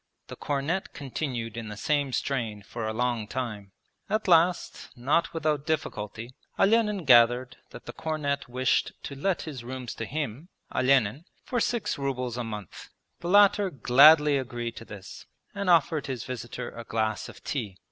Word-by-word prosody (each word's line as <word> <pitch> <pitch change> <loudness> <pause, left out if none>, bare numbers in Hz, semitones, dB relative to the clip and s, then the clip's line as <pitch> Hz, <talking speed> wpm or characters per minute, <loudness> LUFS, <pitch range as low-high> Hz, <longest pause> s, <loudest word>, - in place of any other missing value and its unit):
The - - -7
cornet 145 +6 -2
continued 125 -5 -4
in 115 -2 -5
the 105 - -7
same 145 +3 0
strain 115 -5 -2
for 110 +2 -5
a - - -1
long 120 -1 -1
time. 110 -5 -5 0.4
At 215 -1 0
last, 175 0 +2
not 145 +7 +1
without 155 -3 -1
difficulty, 115 -6 -3 0.2
Olenin 210 -3 +3
gathered 120 0 +5
that - - -12
the - - -7
cornet 145 -4 -2
wished 130 +1 +1
to - - -6
let 180 +7 -1
his 140 -7 -7
rooms 125 -1 -6
to 115 - -5
him, 145 - -4 0.2
Olenin, 130 +2 +2 0.2
for 245 - -1
six 235 -8 -1
rubles 125 -3 -2
a 125 - -3
month. 105 -5 -8 0.3
The 175 - -4
latter 205 0 +5
gladly 145 +1 +6
agreed 120 -2 -5
to 115 - -8
this, 100 -3 -10 0.3
and 200 -1 -2
offered 160 -3 +3
his 130 -4 -4
visitor 125 -1 -6
a 115 - -8
glass 110 -1 -2
of - - -14
tea. 110 -10 -4
130 Hz, 160 wpm, -27 LUFS, 115-155 Hz, 0.4 s, gladly